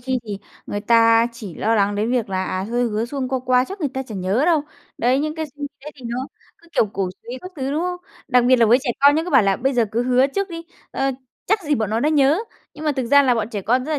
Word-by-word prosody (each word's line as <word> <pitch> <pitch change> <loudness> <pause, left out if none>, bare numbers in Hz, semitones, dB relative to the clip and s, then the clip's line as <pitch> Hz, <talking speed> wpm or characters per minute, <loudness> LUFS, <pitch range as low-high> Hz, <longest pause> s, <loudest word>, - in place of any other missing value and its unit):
khi 255 +1 -1
thì 205 -3 -5 0.3
người 205 - -3
ta 230 0 +5
chỉ 215 -7 -9
lo 225 +2 0
lắng 205 -1 +2
đến 215 +3 -1
việc 245 -4 0
là, 190 -1 -1
à, 185 0 -2
hơi 240 +5 -1
hứa 220 -1 -1
suông 260 +1 -4
qua 260 0 0
qua 250 0 +4
chắc 390 +3 -9
người 295 - 0
ta 265 - -2
chẳng 215 -7 -7
nhớ 195 +8 +1
đâu. 325 -3 +3 0.4
Đấy, 250 +3 +2
những 305 +1 -2
cái 315 -1 -3
xu 290 0 -7
thế 300 - -8
thì 260 - -15
nó 235 - -3 0.4
cứ, 340 - -22
kiểu, - - +3
cổ 195 -2 -1
xúy 245 +2 -7
các 365 - -8
thứ, 270 -1 -2
đúng 300 +3 -1
không? 360 0 -2 0.3
Đặc 250 -2 +4
biệt 255 +1 +5
là 235 -2 +4
với 235 +3 +5
trẻ 265 - -1
con 285 +1 +6
nhé 315 - +1
cứ 360 - -5
bảo 270 -5 +6
là 195 -1 +2
bây 270 +2 0
giờ 240 -3 +2
cứ 235 +2 +1
hứa 255 +1 +3
trước 395 +8 -2
đi, 335 -2 -7 0.3
ờ, 270 0 0 0.4
chắc 420 +1 +1
gì 300 -2 +1
bọn 220 -6 -1
nó 220 +1 0
đã 295 - +2
nhớ, 295 +1 +3 0.4
nhưng 305 - -8
mà 300 - +2
thực 260 -3 -2
ra 285 +3 +6
là 255 -3 +3
bọn 225 -2 -2
trẻ 205 -4 -4
con 250 +5 +1
rất 310 - -3
là 295 - 0
255 Hz, 300 wpm, -21 LUFS, 225-290 Hz, 0.4 s, con